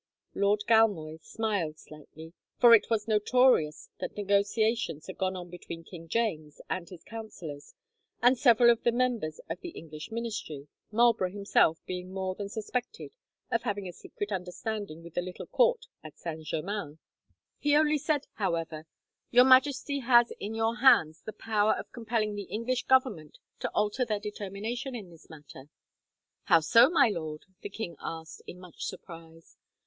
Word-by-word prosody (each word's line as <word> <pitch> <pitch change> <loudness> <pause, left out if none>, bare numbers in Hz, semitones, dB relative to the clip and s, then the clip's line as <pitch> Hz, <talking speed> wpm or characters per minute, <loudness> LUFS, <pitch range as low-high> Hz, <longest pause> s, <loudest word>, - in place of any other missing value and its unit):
Lord 205 +1 +1
Galmoy 195 -9 +3
smiled 200 -9 -2
slightly, 160 +2 -13 0.2
for 240 -2 +8
it 230 - +5
was 220 -2 0
notorious 215 -7 +3
that - - -6
negotiations 205 -4 0
had 190 - -9
gone 190 0 0
on 175 -1 -8
between 170 -1 -8
King 165 -1 -11
James 160 -8 -2
and 175 -2 -4
his 180 -3 -12
councillors, 180 -10 -9 0.4
and 245 +2 +5
several 240 -2 +6
of 235 - 0
the 235 - +2
members 235 -10 -1
of 165 +2 -5
the - - -6
English 155 +3 -9
Ministry, 220 -11 -5 0.2
Marlborough 230 -4 +3
himself 200 -4 +2
being 180 0 -6
more 190 -1 -3
than 200 +1 -6
suspected 245 - -4 0.4
of - - +1
having 205 -5 -3
a 175 - -7
secret 205 +4 -7
understanding 185 -2 -5
with 170 -1 -12
the 175 - 0
little 180 0 -7
court - - +2 0.2
at 155 -1 -11
Saint 160 -2 -7
Germain. 160 -1 -4 0.6
He 295 0 +2
only 305 0 +3
said, 290 0 0
however, 165 -5 -2 0.4
"Your 245 +1 +6
Majesty 275 +2 +4
has 240 -2 +4
in 215 +2 -5
your 225 +1 0
hands 230 - +5
the 215 - -7
power 215 -1 +1
of - - -8
compelling 225 -3 -2
the 205 -2 -6
English 240 +3 -2
Government 245 - +1 0.2
to - - -2
alter 210 +4 +1
their 215 -4 -1
determination 210 +5 -5
in 200 -7 -8
this 165 - -18
matter." 145 -2 -13 0.8
"How 165 - +6
so, 230 - +6
my 330 -8 +4
lord?" 155 -5 -5 0.2
the - - -6
king 195 -4 -6
asked, 160 0 -7
in 180 - -8
much 180 -2 -13
surprise. 165 -1 -10
205 Hz, 160 wpm, -29 LUFS, 165-235 Hz, 0.8 s, for